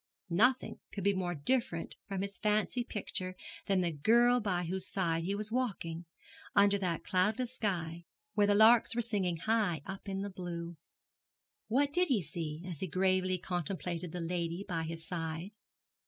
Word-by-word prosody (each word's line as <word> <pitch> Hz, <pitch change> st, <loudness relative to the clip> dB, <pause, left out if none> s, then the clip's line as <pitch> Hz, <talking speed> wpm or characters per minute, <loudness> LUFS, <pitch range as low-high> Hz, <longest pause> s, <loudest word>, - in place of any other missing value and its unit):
Nothing 245 Hz, +9 st, +3 dB
could 200 Hz, -, -5 dB
be 200 Hz, +1 st, +4 dB
more 180 Hz, -2 st, -1 dB
different 170 Hz, -, 0 dB
from 195 Hz, -1 st, -2 dB
his 200 Hz, 0 st, -5 dB
fancy 215 Hz, +3 st, +1 dB
picture 185 Hz, -5 st, -2 dB, 0.3 s
than 195 Hz, -2 st, +3 dB
the 175 Hz, -1 st, 0 dB
girl 235 Hz, +11 st, +4 dB
by 185 Hz, -5 st, 0 dB
whose 185 Hz, +2 st, -2 dB
side 165 Hz, -3 st, 0 dB
he 195 Hz, +2 st, 0 dB
was 210 Hz, +1 st, -3 dB
walking, 180 Hz, -9 st, -2 dB, 0.5 s
under 200 Hz, 0 st, +5 dB
that 180 Hz, -4 st, -1 dB
cloudless 215 Hz, +7 st, +1 dB
sky, 170 Hz, -8 st, -2 dB, 0.3 s
where 205 Hz, -1 st, +3 dB
the 205 Hz, -, +4 dB
larks 225 Hz, +2 st, +6 dB
were 240 Hz, -, +2 dB
singing 195 Hz, -7 st, 0 dB
high 205 Hz, -5 st, +1 dB
up 195 Hz, +1 st, -7 dB
in 195 Hz, 0 st, -2 dB
the 200 Hz, -, -4 dB
blue. 175 Hz, -2 st, -5 dB, 0.9 s
What 280 Hz, +5 st, +2 dB
did 360 Hz, +2 st, +4 dB
he 230 Hz, -9 st, +2 dB
see, 160 Hz, 0 st, -5 dB
as 170 Hz, -5 st, -5 dB
he 190 Hz, -, -2 dB
gravely 185 Hz, +1 st, +2 dB
contemplated 175 Hz, -1 st, -3 dB
the 180 Hz, -, -4 dB
lady 170 Hz, +2 st, -2 dB
by 165 Hz, -4 st, -2 dB
his 165 Hz, 0 st, -6 dB
side? 165 Hz, +3 st, -4 dB
185 Hz, 170 wpm, -33 LUFS, 170-210 Hz, 0.9 s, larks